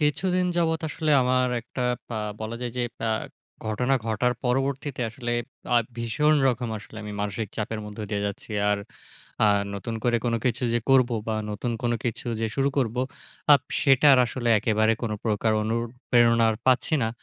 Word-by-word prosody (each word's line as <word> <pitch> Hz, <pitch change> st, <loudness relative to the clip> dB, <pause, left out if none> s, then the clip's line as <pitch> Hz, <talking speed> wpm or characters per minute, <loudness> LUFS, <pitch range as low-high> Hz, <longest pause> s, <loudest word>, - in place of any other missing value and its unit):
কিছুদিন 180 Hz, +5 st, +1 dB
যাবৎ 160 Hz, -1 st, +1 dB
আসলে 155 Hz, +1 st, -2 dB
আমার 130 Hz, 0 st, +2 dB
একটা 125 Hz, +2 st, -6 dB, 0.3 s
ব্যা 115 Hz, -, -4 dB, 0.2 s
বলা 110 Hz, +1 st, -4 dB
যায় 120 Hz, -1 st, -3 dB
যে, -, -, +1 dB, 0.2 s
ব্যা 115 Hz, -, -1 dB, 0.6 s
ঘটনা 125 Hz, +5 st, +1 dB
ঘটার 115 Hz, +3 st, +1 dB
পরবর্তীতে 135 Hz, +2 st, -1 dB
আসলে 120 Hz, +1 st, -4 dB, 0.4 s
আ -, -, +6 dB, 0.2 s
ভীষণ 120 Hz, +7 st, +2 dB
রকম 125 Hz, -1 st, -1 dB
আসলে 110 Hz, +1 st, -13 dB
আমি 105 Hz, 0 st, -6 dB
মানসিক 105 Hz, +1 st, -3 dB
চাপের 110 Hz, 0 st, -3 dB
মধ্যে 105 Hz, +1 st, -6 dB
দিয়ে 100 Hz, -1 st, -1 dB
যাচ্ছি। 100 Hz, +2 st, -6 dB, 0.2 s
আর 105 Hz, -, +1 dB, 0.7 s
আ -, -, +6 dB, 0.3 s
নতুন 105 Hz, +3 st, -4 dB
করে 120 Hz, -1 st, +3 dB
কোনো 115 Hz, -1 st, +1 dB
কিছু 125 Hz, 0 st, 0 dB
যে 120 Hz, -, +2 dB
করব, 130 Hz, -2 st, +5 dB, 0.2 s
বা 110 Hz, -, 0 dB, 0.2 s
নতুন 110 Hz, +4 st, -3 dB
কোনো 120 Hz, -1 st, +1 dB
কিছু 120 Hz, -1 st, -3 dB
যে, 115 Hz, -, +1 dB
শুরু 135 Hz, 0 st, +2 dB
করব, 120 Hz, -3 st, 0 dB, 0.6 s
আপ 140 Hz, -, +3 dB, 0.2 s
সেটার 135 Hz, 0 st, +6 dB
আসলে 120 Hz, 0 st, -3 dB
একেবারে 110 Hz, +1 st, +2 dB
কোনো 110 Hz, -2 st, -1 dB
প্রকার 110 Hz, 0 st, +1 dB
অনুপ্রেরণা 115 Hz, +1 st, +2 dB, 0.2 s
পাচ্ছি 130 Hz, +4 st, +3 dB
না। 110 Hz, -, +1 dB
120 Hz, 165 wpm, -25 LUFS, 110-130 Hz, 0.7 s, আ